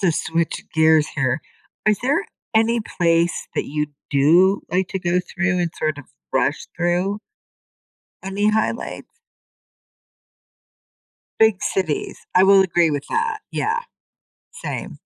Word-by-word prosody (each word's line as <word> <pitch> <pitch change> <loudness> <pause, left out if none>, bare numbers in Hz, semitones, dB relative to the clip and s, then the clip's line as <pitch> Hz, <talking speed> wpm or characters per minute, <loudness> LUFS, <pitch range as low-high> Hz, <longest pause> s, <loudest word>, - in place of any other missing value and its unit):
to 175 - +3
switch 165 +1 -2
gears 160 -1 +4
here, 135 0 0 0.5
is 210 -1 +4
there 285 - +1 0.3
any 225 +1 +3
place 170 -3 0
that - - 0
you 150 +1 -2 0.2
do 170 +8 +4
like 185 +1 0
to 190 - -3
go 180 0 +1
through 190 0 -1
and 175 -2 0
sort 155 -2 -1
of 145 - -9 0.3
rush 135 +2 0
through? 175 +4 0 1.0
Any 195 +2 0
highlights? 220 - -2 2.3
Big 220 -3 +4
cities. 170 -6 -2 0.2
I 185 - +6
will 195 0 +7
agree 175 -3 +2
with 145 -1 -2
that. 460 -1 0
Yeah, 460 +2 -1 0.7
same. - - -6
180 Hz, 125 wpm, -21 LUFS, 160-205 Hz, 2.3 s, will